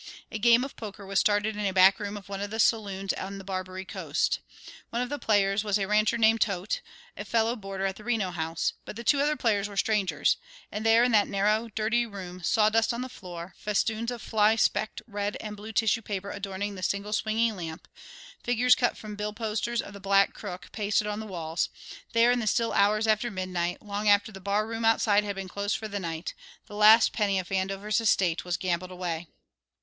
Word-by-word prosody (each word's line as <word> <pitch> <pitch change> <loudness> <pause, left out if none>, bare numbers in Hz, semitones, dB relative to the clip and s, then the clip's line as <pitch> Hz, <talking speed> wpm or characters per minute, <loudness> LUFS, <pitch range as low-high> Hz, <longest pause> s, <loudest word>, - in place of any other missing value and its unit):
A 220 - -4
game 235 +2 +5
of 275 - -6
poker 210 -2 -8
was 195 0 +1
started 210 +1 +2
in 210 - -3
a 195 - +1
back 190 +2 +6
room 205 0 -4
of 200 - -11
one 200 0 -5
of 205 - -3
the 220 +2 -5
saloons 200 -4 +1
on 195 +1 -6
the 195 - -9
Barbary 185 0 -5
Coast. - - -1 0.5
One 235 - -2
of 250 0 -1
the 290 0 -3
players 200 -1 +2
was 205 -1 +1
a 195 - -1
rancher 215 +2 +2
named 225 0 +4
Toedt, 195 - 0 0.3
a - - -6
fellow 230 +1 +1
boarder 195 -3 -5
at 190 0 -2
the 215 - -12
Reno 220 -6 0
House, 165 -1 -2
but - - -8
the 235 - -7
two 280 +5 +3
other 295 +2 +2
players 210 -6 0
were 200 - -9
strangers; 195 -8 +2 0.3
and 210 - -4
there 225 +1 +5
in 245 - +3
that 210 -2 +4
narrow, 210 +3 +1
dirty 230 +2 +1
room, 185 -3 -8
sawdust 220 +5 +2
on 240 - -4
the 255 - -5
floor, 175 -4 -9
festoons 220 +2 0
of 245 -2 -6
fly 215 0 +3
specked 220 0 0
red 205 -2 -3
and 210 -1 -6
blue 210 +2 -8
tissue 225 +1 +2
paper 200 -2 -4
adorning 200 0 -4
the 190 - -8
single 200 +3 -2
swinging 220 +1 +1
lamp, 165 -2 -7 0.6
figures 245 +1 +4
cut 245 - +1
from 215 -1 -8
bill 210 0 -3
posters 225 +2 -2
of - - -10
the 200 - -9
Black 195 0 +3
Crook 185 -3 -8
pasted 210 -1 0
on 210 0 -3
the 220 - -6
walls, 165 -3 -2 0.4
there 230 +1 +5
in 245 - +2
the 220 - -2
still 230 +2 +1
hours 210 +2 +3
after 220 +2 +2
midnight, 180 -3 -3
long 205 0 -1
after 205 +1 +4
the 195 -2 -11
barroom 215 +4 -1
outside 215 -2 +4
had 200 -1 -4
been 195 -1 -5
closed 200 +2 -2
for 220 - -6
the 205 -1 -4
night, 165 -2 -4 0.3
the - - -13
last 215 +2 +6
penny 205 -3 +1
of 185 -2 -3
Vandover's 195 +3 -1
estate 185 -6 +2
was 180 -1 -2
gambled 180 0 -2
away. 175 -2 -4
205 Hz, 215 wpm, -27 LUFS, 195-220 Hz, 0.6 s, back